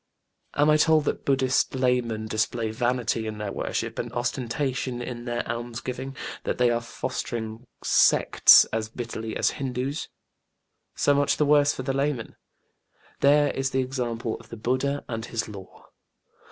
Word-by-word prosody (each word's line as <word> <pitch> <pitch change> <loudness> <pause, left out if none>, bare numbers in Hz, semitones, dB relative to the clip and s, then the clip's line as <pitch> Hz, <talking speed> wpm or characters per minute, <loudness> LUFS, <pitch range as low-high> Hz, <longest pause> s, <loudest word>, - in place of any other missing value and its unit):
Am 145 +1 +3
I 150 - +5
told 155 -1 +4
that - - -3
BudĖĢdĖĢhist 130 -1 +2
laymen 120 -4 +1
display 110 +1 -1
vanity 120 -1 0
in 110 -1 -5
their 105 -2 -4
worship - - -3
and - - -3
ostentation 125 +1 -2
in 120 -1 -6
their 120 -1 -2
almsgiving; 120 +3 -5 0.3
that - - -2
they 125 -1 +3
are 120 0 0
fostering 115 -1 -5 0.2
sects - - +6
as 110 -1 -1
bitterly 115 -2 -5
as - - +2
HindĖĢÅŦs? 135 +2 -3 0.9
So 145 - +3
much 140 0 +2
the 150 - +3
worse 145 0 +5
for 130 - -5
the 135 +1 -1
laymen: 135 -3 -2 0.8
there 145 +1 +4
is 135 0 -1
the 130 0 0
example 120 -3 -3
of 115 - -17
BudĖĢdĖĢha 130 +5 -1
and 115 -1 -4
his 115 - -3
Law. 100 -3 -12
125 Hz, 150 wpm, -26 LUFS, 115-135 Hz, 0.9 s, sects